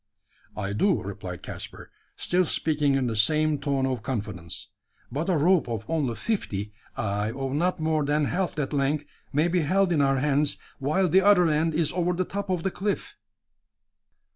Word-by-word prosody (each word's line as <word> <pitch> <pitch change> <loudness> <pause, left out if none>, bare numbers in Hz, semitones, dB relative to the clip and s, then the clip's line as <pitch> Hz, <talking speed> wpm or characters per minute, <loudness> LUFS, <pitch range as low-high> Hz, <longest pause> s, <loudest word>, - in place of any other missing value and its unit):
"I 100 -1 -2
do," 185 - +2
replied 95 -3 -6
Caspar, - - -8 0.2
still 180 +1 +1
speaking 150 -4 +1
in 135 -1 +1
the 115 -2 -1
same 155 +6 +3
tone 140 -1 0
of 130 -4 -1
confidence; 105 -9 -5 0.4
"but 150 +8 -2
a 180 - +3
rope 165 -2 +3
of 110 -1 -3
only 145 -8 0
fifty 105 - -2 0.2
ay, 105 0 -1
of 135 +1 -3
not 175 +5 +1
more 155 -1 +1
than 145 +1 +1
half 180 +5 -1
that 150 -1 -2
length 145 +1 +1 0.3
may 150 +4 +2
be 180 +1 +1
held 185 +4 +2
in 155 -4 +3
our 135 -1 +3
hands, 145 +1 +1 0.2
while 155 +8 +2
the 185 +4 +5
other 190 -3 +5
end 155 +1 +1
is 155 -2 +2
over 180 0 +1
the 185 +1 -1
top 200 +1 -4
of 180 -3 0
the 195 - 0
cliff." 200 +3 -2
150 Hz, 180 wpm, -26 LUFS, 130-175 Hz, 0.4 s, the